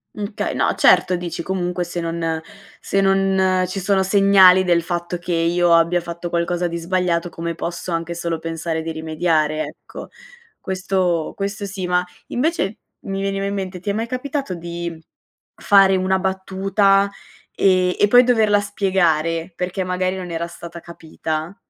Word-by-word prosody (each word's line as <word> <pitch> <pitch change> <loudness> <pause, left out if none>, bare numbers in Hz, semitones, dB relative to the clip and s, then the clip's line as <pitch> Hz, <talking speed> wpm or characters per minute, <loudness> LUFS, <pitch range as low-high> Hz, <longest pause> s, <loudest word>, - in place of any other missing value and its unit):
Mh, 210 0 -5
okay - - -3
no, - - +1
certo, 185 - +4
dici 175 -1 -4
comunque 180 0 -2
se 175 0 -4
non 165 -1 -2 0.4
se 195 - 0
non 195 -1 +2
ci 185 +2 -4
sono 195 0 +1
segnali 190 -1 +6
del 175 -1 +3
fatto 175 0 -3
che 175 +1 -6
io 170 +1 +2
abbia 170 +1 +3
fatto 170 0 -6
qualcosa 175 +1 -1
di 170 0 -4
sbagliato, 175 0 -1
come 170 0 -5
posso 170 +2 -5
anche 165 +1 -2
solo 170 -1 -3
pensare 165 0 -3
di 165 0 -4
rimediare, 155 -1 0
ecco? 150 - -10 0.5
Questo 185 -3 -1
questo 200 +1 -4
sì. 190 -2 -5
Ma, 180 0 +2 0.2
invece, 245 - -1 0.3
mi 195 0 -3
veniva 195 0 -2
in 200 - -2
mente 190 -2 -4
ti 205 - -5
è - - +1
mai 225 +2 -2
capitato 265 -1 -3
di 170 -1 -6 0.5
fare 195 -1 +5
una 190 0 +1
battuta 195 +1 +1 0.5
e 185 -1 +3
e 205 - +4
poi 245 +3 +7
doverla 220 -4 +3
spiegare 175 -4 0
perché, 185 +1 -3
magari, 185 +1 -1
non 180 -1 -6
era 170 0 -3
stata 170 0 -10
capita? 160 0 -5
180 Hz, 160 wpm, -20 LUFS, 170-195 Hz, 0.5 s, poi